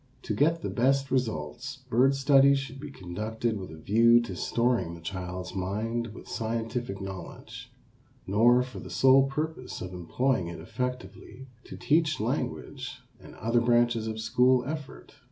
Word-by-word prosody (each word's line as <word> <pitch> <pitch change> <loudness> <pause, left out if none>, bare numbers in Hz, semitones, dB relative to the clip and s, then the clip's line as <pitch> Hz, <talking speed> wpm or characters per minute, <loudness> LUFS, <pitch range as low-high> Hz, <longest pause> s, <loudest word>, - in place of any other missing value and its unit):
To - - -2
get 165 +3 +2
the - - -2
best 135 +2 +1
results, 125 - -2
bird 130 +3 +3
study 140 0 +5
should 135 -1 -5
not - - -11
be 150 - -7
conducted 110 +2 -3
with 95 - -7
a 80 - -10
view 115 +7 +5
to 120 - -6
storing 120 -8 0
the - - -11
child's 90 +1 -5
mind 110 +5 -2
with 110 - -11
scientific 115 -1 -3
knowledge, 95 -3 -8 0.5
nor 120 +5 +4
for 125 0 -9
the - - -9
sole 135 +1 +5
purpose 150 -1 -4
of 90 0 -6
employing 90 +4 0
it 85 - -7
effectively 125 +2 -6 0.2
to - - -9
teach 155 0 +2
language - - -3 0.2
and - - -13
other 115 +2 +1
branches 120 -1 +2
of 110 0 -4
school 125 +3 +3
effort. 150 0 -7
120 Hz, 155 wpm, -28 LUFS, 105-135 Hz, 0.5 s, study